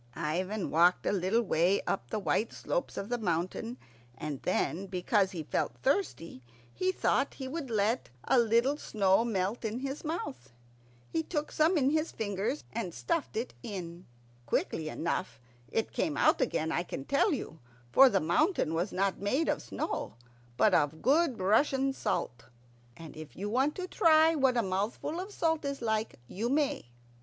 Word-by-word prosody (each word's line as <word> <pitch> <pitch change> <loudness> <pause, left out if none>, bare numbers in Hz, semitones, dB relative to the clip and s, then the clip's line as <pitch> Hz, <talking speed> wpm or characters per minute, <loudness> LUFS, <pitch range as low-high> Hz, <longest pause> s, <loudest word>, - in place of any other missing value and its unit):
Ivan 180 +6 -2
walked 175 +3 +4
a - - +2
little 200 +4 +1
way 180 0 +2
up 120 +1 -2
the - - -2
white 215 +2 0
slopes - - -3
of 200 - -4
the 245 0 -1
mountain, 185 +5 -2 0.4
and 150 -3 -5
then, 190 +4 -1
because 190 +2 +1
he 175 -5 -5
felt - - -2
thirsty, 265 - -1 0.3
he 370 0 0
thought - - +1
he 265 - -6
would 285 -1 -5
let 220 +2 0
a 260 - +4
little 235 +5 +3
snow 200 -5 +2
melt 205 0 -1
in 225 +3 -3
his 275 +1 -4
mouth. 135 - -5 0.5
He 160 +7 -1
took 295 - -3
some 320 +3 +3
in 275 -1 +3
his 315 +1 0
fingers 205 +6 -2
and 200 -7 -4
stuffed 330 -9 -2
it 235 +3 -3
in. 180 -6 -7 0.4
Quickly 155 -1 -1
enough 170 0 -3 0.3
it 225 - -1
came 310 - -1
out - - +4
again, 160 -10 0
I - - +1
can 140 -6 -6
tell 280 +8 +2
you, 230 - -4 0.3
for 270 - +8
the 195 - +2
mountain 175 - +1
was 175 +5 -1
not 195 +1 0
made 260 +11 0
of - - 0
snow - - -4 0.4
but - - +4
of 150 +2 +1
good 280 -1 +3
Russian 270 +7 +2
salt. 120 - -2 0.5
And 165 -3 -10
if 155 -1 -10
you 205 +3 -3
want 265 +5 +2
to 370 -1 -4
try 320 -2 +5
what 265 -5 +2
a 235 - +3
mouthful 205 - -2
of 385 +3 -6
salt 320 -5 0
is 280 -1 -3
like, 220 -1 -1
you 220 - -3
may. 285 - 0
220 Hz, 170 wpm, -30 LUFS, 180-275 Hz, 0.5 s, for